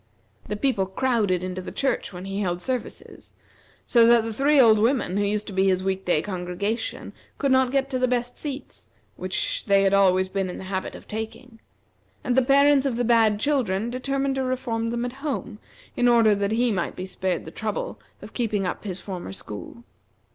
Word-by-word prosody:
The 210 - -2
people 205 -5 0
crowded 205 -4 0
into 185 0 -4
the - - -7
church 270 -6 -1
when 180 0 -8
he 195 +1 -4
held 175 -3 -1
services, 250 +6 -6 0.5
so 235 -2 +5
that 235 -1 +6
the 225 0 -4
three 280 +5 +3
old 220 -4 +6
women 230 -4 +1
who 205 - +2
used 210 +1 -1
to 200 - -8
be 190 +1 +2
his 185 -1 +2
week 190 0 -2
day 165 -3 +2
congregation 190 +3 -3 0.2
could 280 -2 0
not 260 -1 +4
get 275 0 +1
to 255 - -1
the 255 - +2
best 245 0 -1
seats, 290 -2 -7 0.3
which - - -2
they 200 -2 +4
had 195 0 +3
always 190 -1 +4
been 190 -1 -2
in 180 - -6
the - - -8
habit 190 0 -4
of - - -12
taking; 225 +2 -7 0.6
and 245 - 0
the 265 - +5
parents 280 +1 +4
of 255 - -1
the 245 +1 0
bad 225 -3 +4
children 235 -6 0
determined 275 +2 -1
to 265 0 -1
reform 250 -3 -2
them 235 +1 -2
at 245 - -4
home, 260 -7 -4 0.4
in 245 - +2
order 230 -3 +5
that 200 +1 0
he 240 +1 +2
might 185 -4 -2
be 185 - -5
spared 185 -2 -3
the 160 - -8
trouble 215 +2 -4 0.2
of - - -11
keeping 215 -5 -1
up 180 - -4
his 190 -2 -4
former 185 - -6
school. 105 - -9
220 Hz, 205 wpm, -24 LUFS, 190-255 Hz, 0.6 s, that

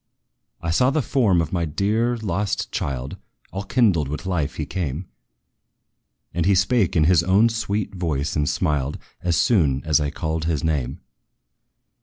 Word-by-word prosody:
I 85 - -1
saw 125 +10 +3
the 145 +1 0
form 105 - +2
of 80 - -7
my 85 -2 0
dear, 105 +9 0
lost 105 -1 -2
child! 65 -6 -3 0.3
All 95 - -4
kindled 100 - +2
with 75 +6 -5
life 90 -6 -1
he - - -3
came; 85 -1 -4 1.3
And 85 0 0
he 100 - +4
spake 95 0 +2
in 80 - +4
his 85 0 +5
own 95 +7 +4
sweet 105 -3 -2
voice, 80 -6 -2
and 75 -2 +1
smiled, 75 -3 -1 0.2
As 85 -2 +1
soon 80 - +2
as 80 0 +3
I 75 -1 -1
called 80 0 -3
his 80 -2 -1
name. 75 -6 -1
85 Hz, 160 wpm, -23 LUFS, 75-100 Hz, 1.3 s, his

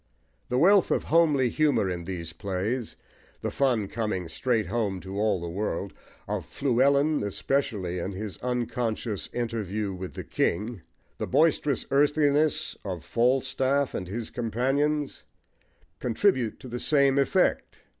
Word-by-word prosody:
The 125 - 0
wealth 195 +6 +5
of - - +1
homely 150 -6 +3
humour 150 -7 +2
in 90 -2 -4
these 85 -3 -5
plays, 105 +5 -3 0.5
the - - -2
fun 125 -7 +1
coming 105 -5 -2
straight 110 +6 0
home 105 -5 -1
to 95 +1 -5
all 105 -3 +2
the 85 - -5
world, 100 +6 -3 0.3
of 105 -2 -2
Fluellen 140 - +2
especially 100 -3 -1
in 95 +3 -4
his 100 +1 -6
unconscious 120 -3 -2
interview 110 -4 -2
with 95 0 -7
the - - -5
king, 105 +3 -1 0.4
the - - -2
boisterous 150 -4 +2
earthiness 145 +1 +2
of 90 -5 -5
Falstaff 130 +3 +1
and 90 - -4
his 110 +4 -5
companions, 135 +6 0 0.8
contribute 125 - +1
to - - -9
the 120 0 -5
same 140 -1 +3
effect. 135 - +1
120 Hz, 135 wpm, -27 LUFS, 100-140 Hz, 0.8 s, wealth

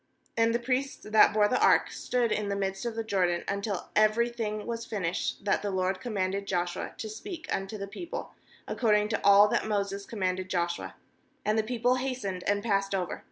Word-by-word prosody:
10And 230 0 +3
the 235 - +2
priests 260 +3 -2
that 215 0 +6
bore 210 0 +4
the 255 - +1
ark - - +5
stood 245 -3 0
in 210 -1 0
the 200 - 0
midst 195 +2 -2
of 230 - -4
the 225 - -2
Jordan, 180 -5 +1
until 200 -1 -3
every 215 +3 +4
thing 215 -3 -3
was 230 -1 -3
finished 195 -3 -3
that 200 - +2
the 205 - -2
LORD 190 0 0
commanded 200 -4 -2
Joshua 175 -1 -2
to 220 - -5
speak 335 - -7
unto 195 +3 -3
the 200 - -4
people, 335 - -7 0.3
according 210 -3 +2
to 220 - -1
all 200 +1 +8
that - - 0
Moses 200 -1 -2
commanded 185 -3 -2
Joshua; 175 -1 -2 0.5
and 215 - +2
the 220 - +3
people 245 +2 +1
hastened 250 -9 -3
and 205 0 +1
passed 195 -3 +1
over. 180 -2 -2
210 Hz, 195 wpm, -29 LUFS, 195-230 Hz, 0.5 s, all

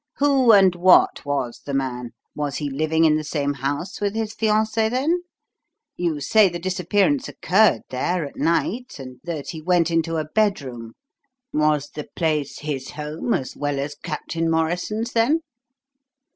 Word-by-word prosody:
"Who 275 -4 +4
and 195 -3 +6
what 180 +1 +4
was 125 -4 -2
the 140 - -4
man? 125 -3 -3 0.2
Was 145 -2 -3
he 145 -2 -3
living 155 +3 +1
in 155 -1 +4
the 155 - -3
same 145 -1 -1
house 145 +9 -4
with 205 0 -1
his 220 -1 -2
fiancée, 220 0 +1
then? 290 +9 +1 0.7
You 170 -4 -1
say 205 +7 +4
the 175 - -5
disappearance 195 - 0
occurred 190 - +3
there, 165 +6 -1
at 140 - -10
night, 195 +9 -1
and 130 -2 -10
that 160 -5 -4
he 160 - -8
went 175 0 +2
into 165 0 0
a 155 - -1
bedroom. 140 - -1 0.6
Was 150 -1 +1
the 150 - -7
place 155 -4 -1
his 140 -3 -4
home, 150 +9 -3
as 130 - -4
well 145 -1 -2
as 145 +1 -3
Captain 165 +1 -3
Morrison's, 180 +8 -1
then?" 255 +8 +2
165 Hz, 160 wpm, -22 LUFS, 145-205 Hz, 0.7 s, and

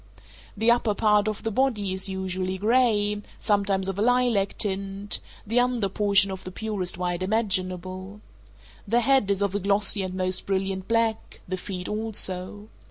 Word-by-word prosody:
The 225 +3 +4
upper 235 -3 +2
part 210 -1 +3
of 215 -1 -3
the 225 - -1
body 210 -5 0
is 190 +1 +1
usually 190 0 -3
gray, 210 -1 +2 0.2
sometimes 200 -2 0
of 195 0 -3
a - - +1
lilac 240 -4 +2
tint; 195 0 -1 0.3
the 230 +4 +2
under 245 -5 +1
portion 200 0 +3
of 190 -1 -6
the - - -6
purest 200 -4 -2
white 180 0 -2
imaginable. 185 -1 -1 0.7
The 235 +4 +3
head 265 -4 +3
is 200 0 +2
of 200 -1 -1
a 205 - 0
glossy 200 +1 +2
and 185 -1 -4
most 185 0 +1
brilliant 190 -1 -2
black, 230 -1 -1
the 185 - -2
feet 180 -1 -6
also. 210 -2 -3
200 Hz, 165 wpm, -25 LUFS, 190-220 Hz, 0.7 s, The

